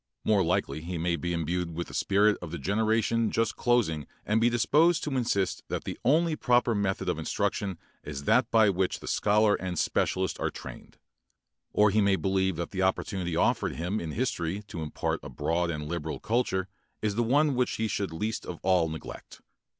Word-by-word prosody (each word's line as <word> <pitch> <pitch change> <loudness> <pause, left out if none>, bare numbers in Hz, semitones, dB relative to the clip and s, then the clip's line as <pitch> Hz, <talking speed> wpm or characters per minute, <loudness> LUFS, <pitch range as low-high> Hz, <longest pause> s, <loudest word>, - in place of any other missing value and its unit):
More 105 -3 +3
likely 80 -4 -1
he 85 +2 -4
may 85 +1 0
be 85 +2 -3
imbued 85 0 -2
with 85 +1 -3
the - - -12
spirit 105 +1 +3
of 90 - -6
the 85 - -5
generation 110 +3 +1
just 115 -1 0
closing 100 - +1 0.2
and 110 +2 +2
be 120 - +5
disposed 155 +8 +3
to 145 -3 -2
insist 100 -7 0
that - - -3
the - - -4
only 160 +5 +3
proper 125 -4 +2
method 100 -2 -1
of - - 0
instruction 95 -4 -1 0.3
is 70 -1 -6
that 115 - +3
by 110 -3 +5
which 95 0 -1
the - - -10
scholar 105 0 +3
and 90 -3 -3
specialist 95 +4 0
are - - 0
trained. - - -10 0.7
Or 105 0 +4
he 110 +2 +3
may 100 -1 +4
believe 95 -1 0
that 85 +1 -4
the 95 - -2
opportunity 95 -2 -1
offered - - +1
him 90 +6 -2
in 80 -2 -5
history 100 -6 -2
to 85 - -5
impart 75 - -2
a - - -8
broad 85 +1 -1
and 75 -2 -4
liberal 80 -1 -4
culture 105 -5 0 0.4
is 105 -1 +1
the 115 - 0
one 140 +5 +3
which 125 -1 0
he 110 - -1
should 100 -4 -2
least 105 +7 -3
of 90 - -6
all 90 -3 +3
neglect. 80 0 -9
95 Hz, 195 wpm, -28 LUFS, 85-115 Hz, 0.7 s, be